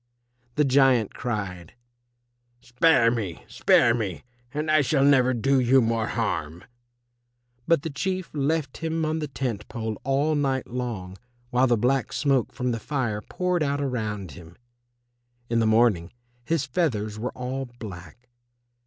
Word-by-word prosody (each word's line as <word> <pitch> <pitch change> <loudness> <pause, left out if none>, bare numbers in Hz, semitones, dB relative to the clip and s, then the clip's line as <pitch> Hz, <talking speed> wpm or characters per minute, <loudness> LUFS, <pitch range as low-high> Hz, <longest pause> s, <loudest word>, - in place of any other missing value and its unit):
The 150 - +3
giant 130 -5 +3
cried, 95 -8 -5 0.8
"Spare 125 -1 +3
me, 105 -8 -4
spare 115 - +4
me, 105 -7 -3 0.3
and 150 +2 -2
I 155 0 +5
shall 140 0 +2
never 130 -3 +5
do 135 +3 +2
you 130 +2 +5
more 115 -2 +1
harm." 85 -8 -2 1.0
But 165 -3 +3
the 160 - -4
Chief 185 +4 -3
left 145 -1 -1
him 160 -1 -2
on 155 +1 -1
the 150 - -3
tent 120 -7 -4
pole 110 -3 -5
all 140 +4 +1
night 135 -3 0
long 115 -7 -5 0.3
while 125 +2 +3
the 120 -2 +3
black 125 +4 +1
smoke 135 -5 +1
from 125 -2 -2
the 115 - -2
fire 120 -5 -2
poured 180 - -1
out 145 -1 0
around 110 - -3
him. 85 0 -13 1.0
In 115 - +3
the 115 - +2
morning 110 -6 +3 0.3
his 160 +1 0
feathers 110 - -1
were 120 +3 -3
all 130 +1 -4
black. 95 +1 -10
125 Hz, 145 wpm, -25 LUFS, 110-140 Hz, 1.0 s, I